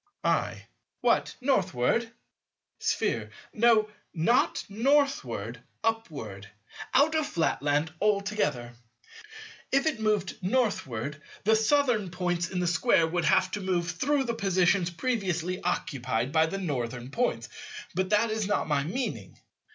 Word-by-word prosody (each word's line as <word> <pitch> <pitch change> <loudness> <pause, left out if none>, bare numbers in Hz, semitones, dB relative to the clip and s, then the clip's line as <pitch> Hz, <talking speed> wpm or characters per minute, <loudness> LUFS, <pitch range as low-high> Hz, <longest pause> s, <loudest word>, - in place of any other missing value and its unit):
I. - - 0 0.4
What? - - +2
Northward? 225 - +1 0.7
Sphere. - - 0 0.2
No, 225 -1 +4 0.3
not 200 +10 +2
Northward; 205 - 0 0.2
upward; 140 - -3 0.5
out 290 +4 +5
of 315 -2 +1
Flatland 150 -1 0
altogether. 200 - 0 1.0
If 275 +2 +3
it 310 -7 0
moved 210 -2 0
Northward, 155 - -1 0.2
the 220 +2 +4
Southern 225 -3 +2
points 175 -1 -1
in 185 - -2
the 180 - 0
Square 165 -1 +3
would 175 0 0
have 185 - +3
to 205 - -3
move 175 -2 0
through 275 - +1
the 235 -2 -2
positions 190 -4 +2
previously 185 -3 -2
occupied 130 -7 -1
by 160 +1 +4
the 195 - -3
Northern 130 -7 -3
points. 245 - -1 0.5
But 185 +1 -1
that 215 +2 +3
is 215 -2 -1
not 205 - 0
my 145 -2 +1
meaning. 245 - -4
185 Hz, 125 wpm, -28 LUFS, 160-225 Hz, 1.0 s, out